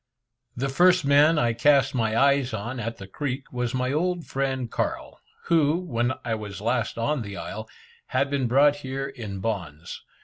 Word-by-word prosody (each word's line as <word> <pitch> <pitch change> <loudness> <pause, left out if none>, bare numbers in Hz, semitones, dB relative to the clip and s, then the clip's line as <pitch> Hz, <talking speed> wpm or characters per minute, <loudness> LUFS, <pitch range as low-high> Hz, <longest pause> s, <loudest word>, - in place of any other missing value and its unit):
The 135 +3 -1
first 180 +4 +4
man 145 +3 +5
I 120 -4 +2
cast 140 +3 +3
my 110 -3 0
eyes 140 -2 +3
on 120 +5 -5
at 115 0 -4
the 100 - -9
creek, 135 +6 -4
was 125 0 -2
my 125 0 0
old 175 +2 0
friend 130 -3 -2
Carl, - - -3 0.2
who, 160 -1 +3
when 125 -8 -1
I 115 - -1
was 105 -2 -5
last 115 +2 -1
on 140 +4 0
the 100 -2 -6
isle, 110 +2 -6 0.4
had 140 - +1
been 135 -3 0
brought 140 +4 +4
here 135 -1 -4
in 110 -8 -7
bonds. 90 -7 -4
130 Hz, 175 wpm, -25 LUFS, 115-140 Hz, 0.4 s, man